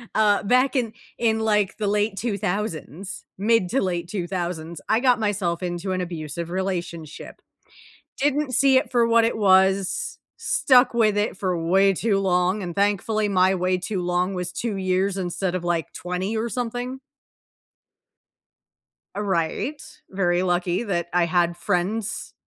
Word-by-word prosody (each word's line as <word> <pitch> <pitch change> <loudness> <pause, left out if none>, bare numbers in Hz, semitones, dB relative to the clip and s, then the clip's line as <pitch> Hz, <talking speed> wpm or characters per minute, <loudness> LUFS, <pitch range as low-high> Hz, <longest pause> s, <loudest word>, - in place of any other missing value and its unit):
uh, 210 -2 +3
back 255 +7 +3
in 235 -4 0 0.2
in 220 -1 +1
like, 210 -3 +1
the 215 -2 -1
late 205 0 +1
2000s, 200 - -4
mid 210 -1 +2
to 270 - +1
late 175 -2 -2
2000s, 175 -3 -4
I 220 - +3
got 250 -2 +3
myself 190 -5 -1
into 175 +2 -3
an 185 - -1
abusive 170 -1 -5
relationship. 175 -4 -5 0.8
Didn't 290 -1 0
see 275 0 +4
it 260 - +2
for 240 -2 +3
what 230 0 +4
it 230 0 0
was, 190 -1 +2 0.2
stuck 255 -2 +3
with 220 -3 +3
it 205 -2 -1
for 185 -3 -1
way 190 +4 +3
too 200 +1 +1
long, 185 +1 +1
and 175 -3 -5
thankfully 205 +1 +1
my 190 0 +3
way 185 0 +1
too 185 +1 -3
long 180 +2 0
was 180 -1 -3
2 230 0 -3
years 190 0 0
instead 180 0 -2
of 180 - -3
like 175 -2 -1
20 180 +4 -3
or 225 +2 -1
something. 245 +2 -4 2.2
A 205 - -2
right, 195 - -1 0.3
very 180 -2 +1
lucky 180 +2 0
that 175 -6 -2
I 175 -1 +3
had 175 0 +1
friends. 200 +4 -2
195 Hz, 150 wpm, -23 LUFS, 180-220 Hz, 2.2 s, see